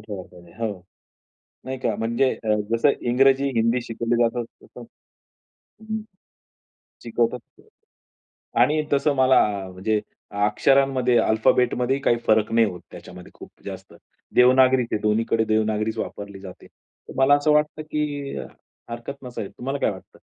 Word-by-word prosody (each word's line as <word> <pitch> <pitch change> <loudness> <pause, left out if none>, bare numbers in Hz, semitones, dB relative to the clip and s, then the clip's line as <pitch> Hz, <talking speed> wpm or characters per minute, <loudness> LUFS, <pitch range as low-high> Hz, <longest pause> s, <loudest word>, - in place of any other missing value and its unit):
ठेवायला 100 -4 -8
पाहिजे, 85 -1 -16
हं. 105 -4 -4 0.8
नाही 130 0 -5
का. 115 -4 -1
म्हणजे 115 +4 +1
अ, 110 -1 +2 0.2
जसं 115 +5 +3 0.2
इंग्रजी, 135 +2 +3
हिंदी 115 +2 +2
शिकवलं 115 +1 -2
जातं, 120 +1 0 0.2
तसं - - -13 1.0
हं, 220 0 -4 1.0
शिकवतात 120 +1 -3 1.0
आणि 155 +1 +3
तसं 145 +1 +2
मला 130 0 +5 0.3
म्हणजे 105 +4 -1 0.5
अक्षरांमध्ये, 130 +2 +2
अल्फाबेटमध्येही 125 +4 +1
काही 120 - +3
फरक 110 0 +2
नाही 115 0 +4
होत 90 -4 -6
त्याच्यामध्ये 90 0 -12
खूप - - -13
जास्त. - - -9 0.4
देवनागरी 130 0 +5
ते - - +1
दोन्हीकडे 110 +1 +1
देवनागरीच 110 0 0
वापरली 100 -1 -6
जाते. 95 -2 -11
तर - - -18
मला 135 +2 +5
असं 145 +1 +2
वाटतं 150 +1 +1
की 150 -2 -4 0.5
हरकत 120 +4 -7
नसावी. 120 -5 -6
तुम्हाला 130 +7 -5
काय - - +1
वाटतं? 95 -2 -12
120 Hz, 130 wpm, -23 LUFS, 110-135 Hz, 1.0 s, मला